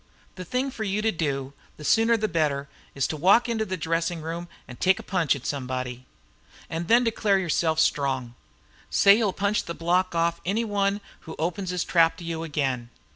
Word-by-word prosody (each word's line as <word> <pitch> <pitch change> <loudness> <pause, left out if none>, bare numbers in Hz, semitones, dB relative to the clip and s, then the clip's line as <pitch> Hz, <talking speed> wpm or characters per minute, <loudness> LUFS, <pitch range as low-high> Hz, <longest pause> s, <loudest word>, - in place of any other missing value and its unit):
The 185 - -7
thing 255 +8 -1
for 220 - -5
you 210 +1 -1
to 220 - +3
do, 140 -5 -2 0.2
the 150 - -10
sooner 225 +8 +4
the 215 0 0
better, 150 -5 0 0.3
is 140 - +1
to 160 - -2
walk 190 +11 +4
into 225 -2 -1
the 185 -2 -3
dressing 165 0 -1
room 170 +2 -5 0.2
and 125 - -11
take 190 +1 +3
a - - -8
punch 170 -7 +1
at 140 -1 -9
somebody. 130 -2 -4 0.6
And 165 +1 -3
then 240 +2 +5
declare 215 -3 +2
yourself 165 -3 +1
strong. 135 -6 +1 0.6
Say 200 +1 +6
you'll 215 -4 +1
punch 200 +2 0
the 170 - -5
block 180 +2 +1
off 170 0 +1
any 215 +6 0
one 200 -1 0 0.3
who 160 - -6
opens 175 +3 -2
his 180 -2 -1
trap 165 -2 +3
to 175 - -9
you 165 -1 -4
again." 135 -7 -2
170 Hz, 195 wpm, -25 LUFS, 150-200 Hz, 0.6 s, Say